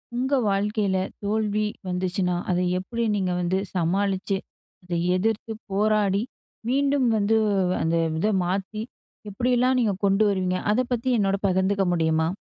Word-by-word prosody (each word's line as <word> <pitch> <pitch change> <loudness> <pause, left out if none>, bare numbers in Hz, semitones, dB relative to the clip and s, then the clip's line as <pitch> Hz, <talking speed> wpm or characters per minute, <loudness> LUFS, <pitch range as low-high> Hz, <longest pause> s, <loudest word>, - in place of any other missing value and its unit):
உங்க 260 +3 -1 0.2
வாழ்க்கையில 200 0 0 0.3
தோல்வி 215 0 0 0.2
வந்துச்சுனா, 180 0 -1 0.2
அத 180 - +1 0.2
எப்டி 230 +5 -3
நீங்க 190 -3 0
வந்து 175 +2 0 0.2
சமாளிச்சு, 195 +3 0 0.5
அத 180 0 -6 0.2
எதிர்த்து 220 +3 -1 0.2
போராடி, 205 0 +2 0.5
மீண்டும் 275 0 +2
வந்து 210 +1 +2 0.5
அந்த 160 +1 +1 0.2
இத 210 - +1 0.2
மாத்தி 195 +4 -2 0.5
எப்டிலாம் 250 +4 +1
நீங்க 220 -4 +2
கொண்டு 195 +2 +3
வருவீங்க? 185 -2 0
அத 225 +4 +2
பத்தி 245 +1 0
என்னோட 195 -2 +2
பகிர்ந்துக்க 190 +1 +1
முடியுமா? 160 -1 +1
200 Hz, 125 wpm, -24 LUFS, 185-220 Hz, 0.5 s, கொண்டு